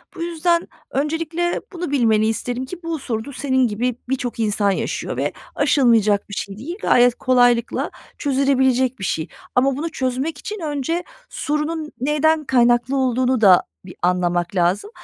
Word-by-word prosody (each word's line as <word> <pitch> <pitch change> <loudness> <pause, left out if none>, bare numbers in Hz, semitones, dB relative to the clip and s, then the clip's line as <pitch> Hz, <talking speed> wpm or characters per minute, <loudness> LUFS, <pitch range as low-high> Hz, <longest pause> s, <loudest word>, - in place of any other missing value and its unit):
Bu - - -7
yüzden 340 0 0 0.2
öncelikle 325 +4 -1
bunu 350 -4 -4
bilmeni 220 -6 +3
isterim 245 +3 -2
ki, 355 +6 -9
bu 330 -1 -3
sorunu 240 +1 -4
senin 260 -2 +1
gibi 235 +3 -1
birçok 250 -3 -2
insan 210 -2 +1
yaşıyor - - -3
ve - - 0 0.2
aşılmayacak 220 -7 +3
bir - - -8
şey 195 0 -5
değil, 300 +10 -6
gayet 245 0 +4
kolaylıkla 245 -3 +2 0.3
çözülebilecek 265 -2 +1
bir - - -6
şey 160 -3 -1 0.3
ama 265 +1 +3
bunu 325 +3 -3
çözmek 265 +3 -2
için 420 +7 -6
önce 315 +2 -2 0.3
sorunun 300 +1 -2
neyden 300 +4 +2
kaynaklı 245 0 +2
olduğunu 255 -1 +1
da 190 -4 +7 0.2
bir 180 - -11
anlamak 175 0 0
lazım. 180 - +1
260 Hz, 150 wpm, -21 LUFS, 225-300 Hz, 0.3 s, da